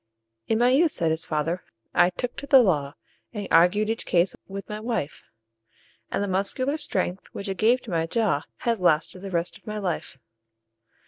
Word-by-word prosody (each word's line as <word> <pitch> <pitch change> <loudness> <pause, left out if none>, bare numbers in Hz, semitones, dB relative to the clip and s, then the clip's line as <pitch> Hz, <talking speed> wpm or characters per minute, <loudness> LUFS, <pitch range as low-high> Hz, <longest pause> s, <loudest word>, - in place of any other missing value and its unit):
"In 225 - +2
my 240 +2 +4
youth," 310 +4 +4
said 165 -2 0
his 160 0 0
fater, 160 +3 -1 0.3
"I 175 0 +5
took 240 +7 -5
to 280 - -6
the 270 - +7
law, 145 -8 0 0.4
And 205 -3 -4
argued 180 +6 +5
each 225 +1 -2
case 175 +1 +2
with 195 0 -7
my 210 0 -5
wife; 220 - -3 0.9
And - - -1
the - - -2
muscular 205 +10 0
strength, 185 - -2
which 200 - -4
it 190 - -3
gave 240 +4 +4
to 225 - -8
my 165 -1 0
jaw, 210 -7 +1 0.2
Has 230 -3 0
lasted 165 0 +2
the 195 - -6
rest 170 -1 -2
of - - -32
my 215 0 -4
life." 180 -8 -3
195 Hz, 190 wpm, -25 LUFS, 170-225 Hz, 0.9 s, the